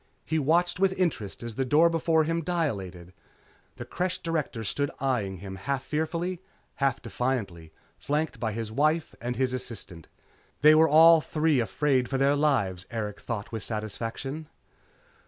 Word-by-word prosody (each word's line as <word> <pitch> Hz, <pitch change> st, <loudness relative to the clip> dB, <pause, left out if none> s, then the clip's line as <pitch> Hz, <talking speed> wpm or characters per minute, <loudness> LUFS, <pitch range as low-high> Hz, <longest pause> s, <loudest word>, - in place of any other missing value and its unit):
He 160 Hz, 0 st, 0 dB
watched 175 Hz, +5 st, +2 dB
with 190 Hz, -1 st, +3 dB
interest 150 Hz, -, -2 dB
as 115 Hz, -1 st, -5 dB
the 135 Hz, -, -1 dB
door 150 Hz, +6 st, +5 dB
before 165 Hz, -1 st, +2 dB
him 165 Hz, +2 st, -1 dB
dilated. 100 Hz, -, -3 dB, 0.6 s
The -, -, -7 dB
Creche 180 Hz, 0 st, -2 dB
Director 160 Hz, -9 st, -3 dB
stood 145 Hz, +6 st, -1 dB
eyeing 115 Hz, -8 st, -1 dB
him 95 Hz, +1 st, -8 dB
half 135 Hz, +6 st, -2 dB
fearfully, 170 Hz, +4 st, -2 dB, 0.4 s
half 135 Hz, -4 st, 0 dB
defiantly, 110 Hz, -10 st, -3 dB, 0.3 s
flanked 150 Hz, -4 st, -2 dB
by 110 Hz, -1 st, -1 dB
his 110 Hz, 0 st, -4 dB
wife 155 Hz, +6 st, +1 dB
and 120 Hz, +1 st, -3 dB
his 130 Hz, +1 st, 0 dB
assistant. 100 Hz, -9 st, -6 dB, 0.6 s
They 155 Hz, +1 st, +9 dB
were 160 Hz, +1 st, +5 dB
all 165 Hz, +2 st, +8 dB
three 155 Hz, -2 st, +1 dB
afraid 125 Hz, +4 st, +1 dB
for 135 Hz, -, 0 dB
their 140 Hz, +2 st, +3 dB
lives, 115 Hz, -12 st, 0 dB
Erikson 105 Hz, -3 st, -5 dB
thought 110 Hz, -4 st, -4 dB
with 110 Hz, -2 st, -4 dB
satisfaction. 115 Hz, +8 st, -5 dB
135 Hz, 155 wpm, -27 LUFS, 110-160 Hz, 0.6 s, They